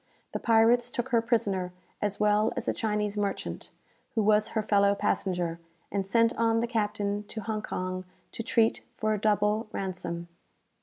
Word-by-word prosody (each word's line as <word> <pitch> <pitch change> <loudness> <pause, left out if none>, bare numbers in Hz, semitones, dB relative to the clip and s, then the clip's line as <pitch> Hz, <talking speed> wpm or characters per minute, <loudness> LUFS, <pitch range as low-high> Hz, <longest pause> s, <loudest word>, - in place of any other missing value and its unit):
The - - -3
pirates 235 +2 +4
took 245 +1 -3
her 235 -3 +3
prisoner, 200 -6 0 0.3
as 205 -1 -1
well 210 +1 +3
as - - -3
a - - +2
Chinese 210 -2 -1
merchant, 200 -1 -3 0.5
who 220 - +2
was 210 +1 +4
her 215 - +2
fellow 200 -1 +4
passenger, 175 -4 -1 0.3
and 195 -1 -1
sent 230 +3 +3
on 225 0 +3
the 235 - +1
captain 210 -3 -1
to 220 +2 -5
Hong 215 -1 -2
Kong, 185 -2 -4 0.3
to - - -4
treat 225 0 +2
for 215 0 0
a 210 - -2
double 210 +1 +2
ransom. 180 -3 -4
210 Hz, 165 wpm, -28 LUFS, 200-225 Hz, 0.5 s, pirates